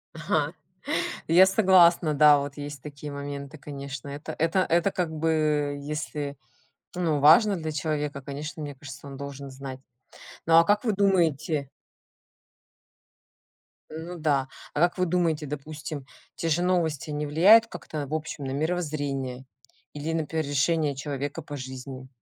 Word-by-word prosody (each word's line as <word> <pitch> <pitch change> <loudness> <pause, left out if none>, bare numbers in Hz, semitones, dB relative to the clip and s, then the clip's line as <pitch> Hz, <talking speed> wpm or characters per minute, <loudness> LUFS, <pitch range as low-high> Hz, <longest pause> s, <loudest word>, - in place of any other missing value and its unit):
Ага, - - 0 0.7
я 175 +4 +7
согласна. 185 -5 +5
Да, 150 0 +7
вот 140 0 -5
есть 145 -2 -7
такие 145 0 -8
моменты. 140 +1 -6
Конечно, 140 -1 -7
это 145 +3 -6
это 165 +4 +2
это 175 +1 +2
как 175 -4 -2
бы 155 -2 +1
если, 145 -1 -4 0.6
ну, 165 -5 0
важно 180 +8 +6
для 160 -2 -4
человека, 150 -2 -2
конечно, 150 +3 -6
мне 145 -1 -5
кажется, 135 0 -10
он 140 - -8
должен 140 0 -7
знать. 130 0 -8 0.7
Ну, 165 - +4
а 165 - +8
как 205 +2 +2
вы 220 - +2
думаете 165 -7 +1 2.2
ну 165 +3 -7
да, 140 -4 +1 0.3
а - - -2
как 175 +3 +3
вы 185 - +2
думаете, 165 -3 0
допустим, 150 0 -6 0.3
те 165 - -2
же 160 +2 +2
новости 170 -5 0
не 150 0 -2
влияют 195 +10 +6
как-то 150 -8 -6
в 145 - -7
общем 155 -2 -4
на 130 - -3
мировоззрение 145 -4 -2 0.5
или, 150 +2 -3
например, 160 -1 -1
решения 145 +1 +1
человека 145 +2 -4
по 145 -1 -7
жизни? 130 0 -8
150 Hz, 145 wpm, -26 LUFS, 140-165 Hz, 2.2 s, а